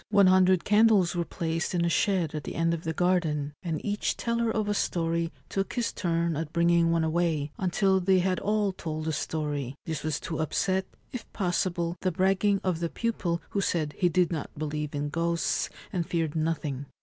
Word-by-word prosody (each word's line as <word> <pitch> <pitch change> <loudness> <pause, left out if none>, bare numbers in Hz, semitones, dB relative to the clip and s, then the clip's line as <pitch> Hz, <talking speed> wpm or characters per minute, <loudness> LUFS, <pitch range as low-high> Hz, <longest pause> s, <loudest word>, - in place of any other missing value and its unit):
One 200 -2 +5
hundred 185 -1 +5
candles 210 -4 +4
were 175 - +1
placed 165 +1 -2
in 170 -1 +2
a - - +2
shed 180 -3 +1
at 150 -1 -4
the - - -6
end 165 0 +1
of 170 0 -4
the 160 - 0
garden, 160 -4 0
and 165 -4 -2
each 205 0 -1
teller 235 0 0
of 215 -1 0
a 205 - +1
story 170 -3 0 0.2
took 195 0 -2
his 240 -2 -1
turn 170 -2 0
at 155 0 -3
bringing 170 0 +3
one 165 -1 +2
away, 160 -3 0
until 190 +1 +2
they 190 +1 +3
had 185 0 +1
all 210 -1 +1
told 160 -4 -5
a - - +1
story; 145 -3 -3
this 160 -3 -3
was 155 -1 -2
to 160 - -4
upset, 185 +4 0 0.2
if 250 - -7
possible, 175 -2 -1
the 185 - +1
bragging 195 +3 +2
of 180 -3 0
the 170 -1 -1
pupil 175 -8 -2
who 200 - 0
said 155 -5 0
he 180 - +2
did 180 +1 +2
not 160 -4 -3
believe 150 0 -3
in 145 0 -2
ghosts 170 +2 0 0.2
and 175 -3 -1
feared 165 -4 -1
nothing. 155 -4 -2
170 Hz, 195 wpm, -28 LUFS, 160-190 Hz, 0.2 s, One